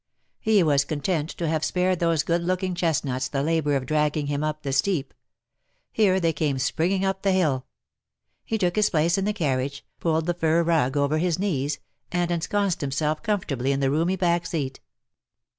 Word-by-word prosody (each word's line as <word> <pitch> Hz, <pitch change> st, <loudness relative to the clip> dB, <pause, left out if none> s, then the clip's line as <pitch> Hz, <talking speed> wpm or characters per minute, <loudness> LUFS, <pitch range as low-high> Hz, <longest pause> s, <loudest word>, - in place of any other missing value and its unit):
He 215 Hz, -4 st, +3 dB
was 145 Hz, -3 st, +3 dB
content 155 Hz, +2 st, -2 dB
to 170 Hz, -, -3 dB
have 155 Hz, 0 st, 0 dB
spared 180 Hz, +2 st, +1 dB
those 165 Hz, -4 st, +2 dB
good 170 Hz, 0 st, 0 dB
looking 185 Hz, +1 st, -1 dB
chest 165 Hz, -4 st, 0 dB
nuts 130 Hz, -1 st, -2 dB
the 135 Hz, +1 st, -2 dB
labour 155 Hz, -2 st, +1 dB
of 135 Hz, -2 st, -1 dB
dragging 150 Hz, +1 st, +1 dB
him 145 Hz, +1 st, -2 dB
up 155 Hz, 0 st, -3 dB
the 135 Hz, -2 st, -2 dB
steep. 145 Hz, -1 st, 0 dB, 0.8 s
Here 195 Hz, -4 st, +3 dB
they 165 Hz, -2 st, +1 dB
came 145 Hz, -2 st, 0 dB
springing 175 Hz, +9 st, 0 dB
up 195 Hz, 0 st, -1 dB
the 195 Hz, -, +2 dB
hill. 155 Hz, -9 st, +1 dB, 0.8 s
He 225 Hz, -, -2 dB
took 180 Hz, -4 st, 0 dB
his 210 Hz, 0 st, +4 dB
place 170 Hz, +3 st, +2 dB
in 195 Hz, -, -1 dB
the 210 Hz, -, +1 dB
carriage, 140 Hz, -7 st, -2 dB
pulled 160 Hz, -1 st, 0 dB
the 175 Hz, -, +1 dB
fur 165 Hz, 0 st, +2 dB
rug 150 Hz, -5 st, +1 dB
over 145 Hz, +2 st, +2 dB
his 175 Hz, -1 st, +1 dB
knees, 150 Hz, -7 st, -1 dB, 0.3 s
and 175 Hz, -1 st, 0 dB
ensconced 180 Hz, +2 st, 0 dB
himself 150 Hz, +2 st, -1 dB
comfortably 150 Hz, -, -1 dB
in 140 Hz, -, 0 dB
the 135 Hz, -1 st, +1 dB
roomy 165 Hz, +5 st, +1 dB
back 175 Hz, -2 st, +1 dB
seat. 135 Hz, -5 st, -3 dB
160 Hz, 190 wpm, -25 LUFS, 145-180 Hz, 0.8 s, his